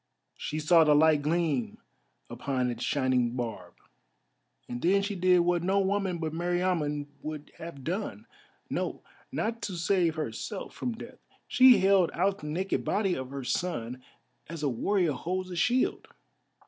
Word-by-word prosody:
She 155 - -4
saw 160 +2 +5
the 150 -1 +5
light 155 0 +5
gleam 150 -5 0 0.5
upon 130 -3 -2
its 120 0 -5
shining 130 -3 +1
barb, 105 -8 -5 0.9
and 120 0 -5
then 195 +3 +3
she 205 +1 -2
did 180 -1 +4
what 175 0 +1
no 190 +3 +2
woman 195 -2 0
but 160 -2 -3
Meriamun 170 -4 0 0.2
would 155 -1 -6
have 165 -5 -8
done, 205 - -4 0.4
no, - - -3 0.3
not 230 +1 -2
to 190 - -4
save 175 -2 +2
herself 155 - -5
from 245 - -3
death—she 250 +2 +3
held 190 -2 +4
out 195 +3 +1
the 150 - -7
naked 185 +6 -1
body 200 -3 +1
of 130 -5 -4
her 140 0 -6
son 130 -3 -2 0.5
as 165 -2 -6
a 145 - +2
warrior 175 - +1
holds 185 +7 -3
a - - -5
shield. 245 +9 +1
170 Hz, 150 wpm, -29 LUFS, 145-190 Hz, 0.9 s, saw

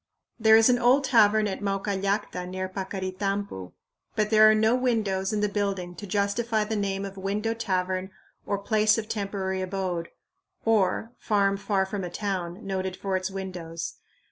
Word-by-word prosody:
There 220 0 +7
is 225 - +6
an 245 -1 +4
old 250 +3 +4
tavern 215 -4 +4
at 195 - -4
Maucallacta 195 -1 -1
near 185 +1 -3
Paccaritampu, 190 - -4 0.4
but 215 0 0
there 215 0 +8
are 215 - +5
no 220 +2 +3
windows 220 -6 0
in 210 -1 0
the 210 - +2
building 200 -3 -2
to 205 +3 -9
justify 210 +3 0
the 220 +1 -3
name 200 -1 -1
of 195 0 -8
"window 205 +4 -1
tavern" 185 -4 -1 0.3
or 200 - -1
"place 215 +2 +2
of 220 -1 -3
temporary 195 -3 -2
abode" 185 -3 -3 0.6
(or 225 0 +2
"farm 200 -2 +2
far 195 -1 0
from 195 0 -4
a 175 - -4
town") 185 -1 -4
"noted 190 -1 -2
for 195 -1 -2
its 185 +1 -1
windows." 180 -4 -6
200 Hz, 165 wpm, -26 LUFS, 190-215 Hz, 0.6 s, there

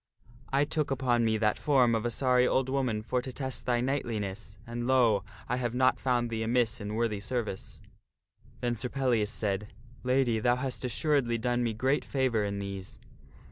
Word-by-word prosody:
I 140 +2 +3
took 150 -1 -1
upon 125 -3 +1
me 110 -1 +2
that 105 -1 +1
form 130 -5 +4
of 115 +1 0
a - - 0
sorry 125 0 +3
old 130 0 +1
woman 130 -6 0
for 125 +2 0
to 130 - -6
test 130 -1 -5
thy 120 -1 +2
knightliness, 110 -6 -3
and, 120 0 -4
lo! 120 -6 +4 0.2
I 125 - 0
have 120 -2 -2
not 130 -1 +3
found 120 -2 0
thee 110 -1 -2
amiss 115 0 +1
in 105 +1 -4
worthy 110 -3 0
service." 105 -2 -4 0.8
Then 120 -1 0
Sir 120 +2 -3
Pellias 120 -6 +1
said, 105 0 -3
" 120 +1 -22
Lady, 125 -3 +2
thou 120 +2 +3
hast 130 0 -3
assuredly 125 -1 +1
done 120 +1 0
me 115 -2 0
great 130 +6 +1
favor 130 -6 0
in 100 0 -2
these." 100 -1 -6
120 Hz, 185 wpm, -29 LUFS, 110-130 Hz, 0.8 s, form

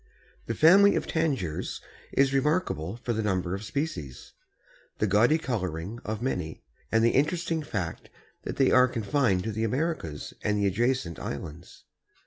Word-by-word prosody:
_) - - -31
The 115 - -2
family 195 - +7
of - - -1
Tanagers 135 - -2 0.3
is 135 0 +3
remarkable 135 - 0
for 120 0 -3
the 110 - -1
number 95 -4 -1
of 100 +2 -4
species, 100 - -5 0.6
the - - +1
gaudy 110 +9 +4
coloring 100 - -3
of 110 +2 -4
many 90 -11 -3 0.3
and 115 0 +3
the 115 - +4
interesting 165 +3 +1
fact 95 - -4 0.3
that - - -5
they 135 - +3
are 125 0 +6
confined 115 -5 +1
to 110 - -2
the 110 +1 -2
Americas 120 - -2
and 105 0 +1
the 100 - +1
adjacent 100 - 0
islands. 80 +2 -7
115 Hz, 155 wpm, -27 LUFS, 95-140 Hz, 0.6 s, family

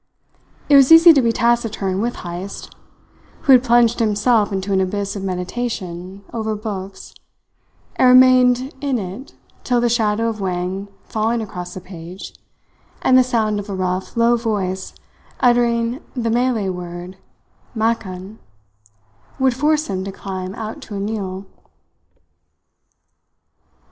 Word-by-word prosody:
It 290 - +5
was 275 +1 +6
easy 330 +1 +9
to 280 - +4
be 230 -2 +2
taciturn 225 -5 0
with 240 +2 -2
Heyst, 180 +3 -7 0.7
who 280 - +3
had 255 -1 +7
plunged 240 -1 +3
himself 215 0 +2
into 195 0 -2
an 190 - +2
abyss 200 +2 -2
of 200 - -5
meditation 185 -1 -5
over 220 -2 -2
books, 200 -3 -7 0.8
and 255 - +5
remained 255 +1 +5
in 275 -3 0
it 200 +6 -7 0.3
till 245 -1 +1
the 240 0 +2
shadow 225 -1 +1
of 220 -2 -4
Wang 185 +1 -3 0.2
falling 225 +2 -1
across 180 -5 -7
the 185 - -7
page, 175 0 -10 0.7
and 255 - +4
the 255 - +7
sound 220 -4 0
of 205 +1 -8
a 195 - -3
rough, 185 +2 -3
low 235 +1 +4
voice 195 -5 -3 0.4
uttering 240 +1 +2
the 230 -3 -1
Malay 235 -4 +1
word 180 0 -7 0.6
"makan," 215 -3 -3 1.0
would 265 -1 +2
force 300 +4 +1
him 190 -2 -3
to 195 - -5
climb 190 -1 -6
out 220 -1 -6
to 210 - -8
a - - -3
meal. 200 -2 -4
215 Hz, 135 wpm, -19 LUFS, 190-240 Hz, 1.0 s, easy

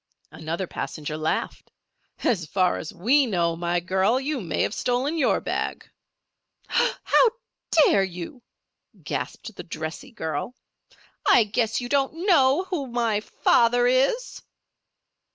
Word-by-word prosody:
Another 165 +4 -4
passenger 155 -3 -5
laughed. 155 +1 -3 0.5
"As 175 -9 +1
far 185 0 +1
as 160 - -7
we 260 +9 +3
know, 170 -5 0
my 175 +1 -1
girl, 190 +7 +1
you 275 -1 -3
may 165 -5 -1
have - - -1
stolen 255 +8 -1
your 310 -5 +2
bag." - - -3 0.8
"How - - +3 0.4
dare 290 -11 +4
you?" 185 - -7 0.6
gasped 225 - -5
the - - -8
dressy 160 - -6
girl. 160 - -4 0.7
"I 235 - +7
guess 220 +2 -1
you 245 - -4
don't 285 +6 0
know 290 -3 +4
who 295 -7 -2
my 235 -3 0
father 240 +3 +2
is?" 270 - +1
230 Hz, 125 wpm, -24 LUFS, 175-270 Hz, 0.8 s, I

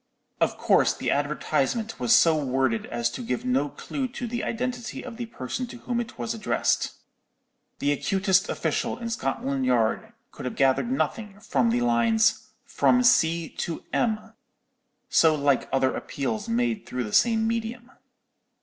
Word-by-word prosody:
Of - - +1
course - - +3
the - - -1
advertisement 225 - -1
was 125 -2 +4
so 165 -1 +5
worded 130 -5 0
as 120 0 -1
to - - -6
give 125 +1 -3
no 135 +3 +1
clue 265 - -4
to 245 0 -6
the 240 0 -3
identity 245 0 -4
of 245 -3 -8
the 240 -1 -5
person 225 - -5
to 240 - -10
whom 240 0 -3
it 230 - -8
was 230 - -3
addressed. 220 -3 0 0.8
The 145 - +1
acutest 190 +5 +1
official - - -1
in 230 -1 -5
Scotland 135 - -2
Yard 125 - +1 0.2
could - - -9
have 125 - -3
gathered 135 - +2
nothing 210 -6 -2
from 130 - +1
the 120 +1 +1
lines 220 - +2 0.2
'From 250 0 +3
C. 165 -8 +3
to 165 - -3
M.,' 220 -1 -1 0.7
so 160 -1 +4
like 140 -3 +1
other 130 -1 +2
appeals 205 - -3
made 230 -3 0
through 125 0 -3
the 105 - -7
same 225 -2 +3
medium. 230 +2 -3
195 Hz, 160 wpm, -26 LUFS, -, 0.8 s, so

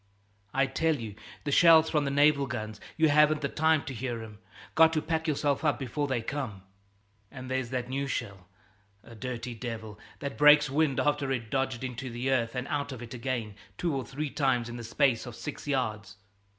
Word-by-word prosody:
"I 135 +1 +2
tell 160 +4 +1
you, 115 -6 -6 0.3
the 145 - -2
shells 160 +1 +7
from 150 -3 +2
the - - 0
naval 140 0 +4
guns, 110 -4 -5 0.2
you 160 -1 +4
haven't 150 +1 +4
the 140 - 0
time 160 +1 +2
to 135 - -5
hear 120 -1 -4
'em. 105 -2 -11 0.3
Got 160 0 +6
to 155 - +2
pack 160 0 -1
yourself 145 -1 0
up 145 -5 +2
before 145 +2 -2
they 125 -4 -1
come." 120 -8 -4 0.7
"And 130 0 -8
there's 130 -2 -1
that 125 -1 -3
new 135 +2 -2
shell, 100 -8 -4 0.6
a - - -13
dirty 120 +1 -5
devil, 110 -3 -6 0.2
that 140 -1 -6
breaks 150 -1 +7
wind 145 -2 +2
after 145 -2 +1
it's 120 -4 -3
dodged 130 -3 -1
into 130 0 -5
the 120 +3 -2
earth 115 -2 0
and 125 +2 -3
out 145 -1 -2
of 125 -2 -7
it 120 - -9
again 120 -4 -3 0.2
two 170 -5 -1
or 135 - -2
three 145 +2 -4
times 125 -5 +1
in 120 - -6
the 120 - -7
space 120 +1 +1
of 120 - -8
six 150 +2 -7
yards. 110 -7 -2
130 Hz, 205 wpm, -29 LUFS, 120-145 Hz, 0.7 s, shells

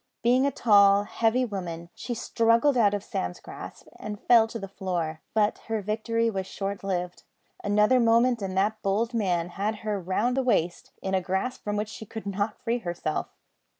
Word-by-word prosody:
Being 250 +3 +4
a - - 0
tall, 200 -4 +5
heavy 230 +4 +1
woman, 170 -6 -5
she 245 - -5
struggled 230 +5 +2
out 205 -4 +4
of 200 - -4
Sam's 90 - -4
grasp - - -10
and 210 -1 -6
fell 230 -2 +5
to 225 - -6
the 195 -3 -6
floor; 175 -5 -3
but 215 -1 +2
her 225 -1 -1
victory 230 +3 0
was 190 -4 -2
short 200 0 -4
lived. 180 -2 -3 0.4
Another 210 +5 +4
moment 235 0 +3
and 190 -1 -3
that 215 +3 +1
bold 220 +4 0
man 180 -6 0
had 205 +5 -2
her 210 -2 -1
round 205 +8 0
the 265 - +2
waist, 175 -9 0
in 190 - -2
a 190 - +2
grasp 190 +8 -2
from 205 0 -2
which 210 0 -2
she 220 0 -9
could 220 +1 -7
not 205 +2 -2
free 240 0 0
herself. 175 -6 -3
210 Hz, 185 wpm, -27 LUFS, 190-230 Hz, 0.4 s, tall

